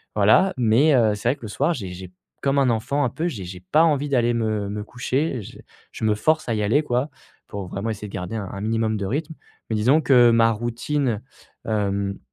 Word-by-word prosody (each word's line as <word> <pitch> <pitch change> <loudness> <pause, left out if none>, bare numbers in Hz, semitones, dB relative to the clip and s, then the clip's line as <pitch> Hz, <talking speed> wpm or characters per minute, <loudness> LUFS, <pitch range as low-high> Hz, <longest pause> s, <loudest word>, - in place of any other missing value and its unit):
Voilà, 110 - +4
mais, 125 +6 +4
heu, 110 -4 +3
c'est 115 +4 -1
vrai 135 - +1
que 120 - -19
le 110 - -6
soir, 145 +10 0
j'ai 100 - -6
j'ai 90 0 -9 0.3
comme 140 0 +1
un 130 -2 +3
enfant 140 +6 0
un - - 0
peu, 165 +8 -3
j'ai 100 - -5
j'ai 90 0 -8
pas 155 +2 +5
envie 145 -3 +1
d'aller 120 -3 +2
me 110 -3 -1
me 105 0 -4
coucher, 125 +3 -2
je - - -12 0.3
je - - -9
me 105 -1 +2
force 155 +3 +1
à 115 - +1
y 105 - -1
aller 120 +9 +3
quoi, 125 +2 -1 0.4
pour 100 -2 -6
vraiment 100 +5 -4
essayer 105 0 -6
de - - -15
garder 90 +2 -5
un 100 - -4
un 100 - -7
minimum 110 0 0
de 100 - -3
rythme. 150 - -3 0.3
Mais 110 - 0
disons 130 +9 +3
que 120 -4 +5
ma 115 0 +4
routine, 120 +1 -2 0.4
hem, 100 -2 -1
115 Hz, 230 wpm, -23 LUFS, 105-140 Hz, 0.4 s, pas